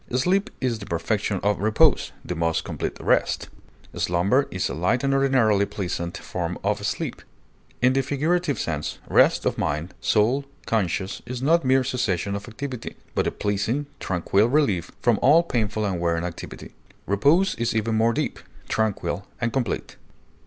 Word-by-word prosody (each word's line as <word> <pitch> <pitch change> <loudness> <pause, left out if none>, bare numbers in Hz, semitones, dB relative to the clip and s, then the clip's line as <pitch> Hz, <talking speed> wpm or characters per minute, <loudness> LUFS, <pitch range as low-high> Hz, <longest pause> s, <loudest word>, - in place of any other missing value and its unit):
Sleep 190 - +2
is 120 -4 -1
the 100 - -9
perfection 100 +3 -1
of 105 -1 +1
repose, 110 +2 +3
the - - -3
most 80 -1 0
complete - - -4
rest; - - +1 0.4
slumber 95 +11 +2
is 95 - -1
a - - -4
light 90 - +1
and 135 0 +2
ordinarily 125 -7 +3
pleasant 85 -3 -4
form - - -4
of - - 0
sleep. - - -3 0.6
In 125 +1 +5
the 135 - +3
figurative 150 +3 0
sense, 75 -3 -3
rest - - +4
of - - 0
mind, 75 +5 -2
soul, 120 +6 +2 0.2
conscience, 95 -3 -1
is 125 0 -5
not 165 +3 +4
mere 130 0 +3
cessation 100 -7 -1
of 100 +2 -6
activity, 125 +1 -6 0.2
but - - +1
a - - +1
pleasing, 105 +8 -1
tranquil 95 +4 +1
relief 105 - +2
from 120 -4 +3
all 160 +5 +6
painful 110 -8 -1
and 95 -4 -1
wearying 85 0 0
activity; 85 -1 -8 0.3
repose 145 - +3
is 120 -1 0
even 110 0 0
more 110 +1 +3
deep, - - -2 0.3
tranquil, 105 -2 -1
and 120 -1 -1
complete. 130 -4 -2
110 Hz, 160 wpm, -24 LUFS, 95-135 Hz, 0.6 s, all